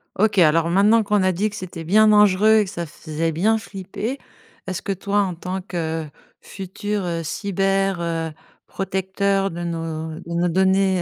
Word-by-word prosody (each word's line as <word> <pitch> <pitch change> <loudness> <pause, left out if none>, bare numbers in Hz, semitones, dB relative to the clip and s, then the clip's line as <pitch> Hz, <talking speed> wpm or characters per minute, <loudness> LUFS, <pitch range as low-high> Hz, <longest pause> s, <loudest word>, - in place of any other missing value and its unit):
OK, 205 -1 +2
alors 165 0 +4
maintenant, 210 +5 +4
qu'on 205 0 +1
a 185 0 +3
dit 200 +4 0
que 205 - -10
c'était 180 -4 -7
bien 215 +6 +5
dangereux 210 +1 +5
et - - +3
que - - -8
ça 170 - -4
faisait 160 +1 -3
bien 205 +8 +2
flipper, 210 +5 -5 0.5
est-ce 185 -1 -4
que, - - -3
toi, 200 +2 -1
en 185 -3 -2
tant 185 +3 -4
que 165 -4 -3 0.3
futur, 200 +1 -4
heu, 170 -1 -2
cyber, 195 +2 0
heu, 165 -1 -2 0.3
protecteur 195 +1 -1
de 170 +1 -5
nos 160 -1 -4
de 170 - -8
nos 170 +1 +1
données 190 +1 +2
190 Hz, 175 wpm, -22 LUFS, 170-200 Hz, 0.5 s, bien